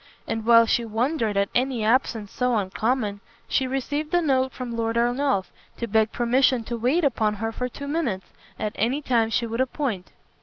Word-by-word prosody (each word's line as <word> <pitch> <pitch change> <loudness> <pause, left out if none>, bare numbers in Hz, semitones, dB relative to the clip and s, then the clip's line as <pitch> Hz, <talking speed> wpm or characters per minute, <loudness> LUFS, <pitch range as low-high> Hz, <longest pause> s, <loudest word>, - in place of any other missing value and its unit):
And 225 0 -3
while 230 -1 +7
she 235 +1 +1
wondered 225 -1 -1
at 200 0 +2
an 260 +2 +2
absence 225 -2 +1
so 250 -1 0
uncommon, 210 +2 -1 0.3
she 265 - +1
received 290 +4 -2
a 350 - +4
note 265 -3 +2
from 245 -2 -6
Lord 230 0 -1
Ernolf, 240 -3 +1 0.3
to 235 - -2
beg 220 0 +2
permission 250 0 +2
to 235 +1 -4
wait 255 +9 +1
upon 220 -6 +1
her 225 +2 -3
for 250 +2 -3
two 280 +3 -8
minutes, 275 - -1 0.3
at 215 - -2
any 255 +8 0
time 230 -4 +2
she 235 +1 0
would 230 +2 -2
appoint. 255 - -2
235 Hz, 185 wpm, -24 LUFS, 220-265 Hz, 0.3 s, while